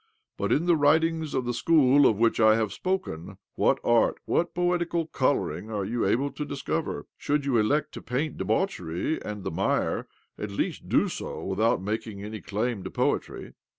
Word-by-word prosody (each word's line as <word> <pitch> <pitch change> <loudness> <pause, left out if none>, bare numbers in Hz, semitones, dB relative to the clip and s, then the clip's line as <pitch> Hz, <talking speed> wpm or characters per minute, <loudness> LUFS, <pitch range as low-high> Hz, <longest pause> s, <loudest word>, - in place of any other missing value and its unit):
But - - -2
in 165 - +2
the 175 -1 +4
writ 155 +2 +4
ings 165 -2 -2
of 130 - 0
the 120 - -1
school 145 -2 +5
of 110 - +2
which 115 +1 +2
I 110 -1 +6
have 110 -3 -1
spoken, 180 - -3 0.2
what - - +2
art, 120 -1 +3
what 175 - 0
poetical 175 -1 0
colouring, 130 -6 -1
are 105 -3 -2
you 120 +3 -1
able 140 +4 +1
to 150 - -5
discover? 145 +3 -3
Should 145 0 0
you 130 -5 +2
elect 145 +8 +1
to - - -8
paint 140 +5 -2
debauchery 95 - -1
and 105 -2 -6
the - - -3
mire, 95 +5 0 0.3
at 105 - -4
least 100 - -3
do - - +3
so - - -5
without 95 0 +1
making 105 0 -4
any 105 0 -6
claim 110 0 -2
to - - -5
poetry." - - -2
120 Hz, 185 wpm, -27 LUFS, 105-155 Hz, 0.3 s, I